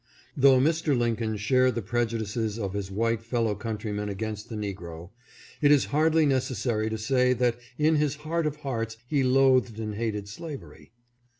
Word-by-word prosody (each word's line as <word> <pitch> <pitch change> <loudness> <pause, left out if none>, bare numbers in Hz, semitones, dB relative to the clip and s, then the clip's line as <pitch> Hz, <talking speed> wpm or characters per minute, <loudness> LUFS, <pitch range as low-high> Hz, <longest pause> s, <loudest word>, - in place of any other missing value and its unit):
Though 135 -2 +6
Mr. 155 0 +2
Lincoln 115 -2 0
shared 130 +4 +2
the 115 - -2
prejudices 110 0 -2
of 100 -4 -3
his 100 -1 -3
white 115 +3 0
fellow 115 -2 0
countrymen 105 -1 -4
against 105 +1 -5
the 115 - -5
negro, 90 -4 -6 0.5
it 145 -1 +5
is 145 -2 +5
hardly 160 +1 +4
necessary 120 -5 0
to 110 - -3
say 125 +3 +2
that 120 -1 0 0.2
in 155 +1 +3
his 150 -1 +1
heart 165 0 0
of 150 - -3
hearts 115 -4 -3
he 140 +1 +1
loathed 130 -3 +3
and 110 -1 -3
hated 105 -2 -3
slavery. 140 +5 -9
115 Hz, 165 wpm, -27 LUFS, 105-135 Hz, 0.5 s, Though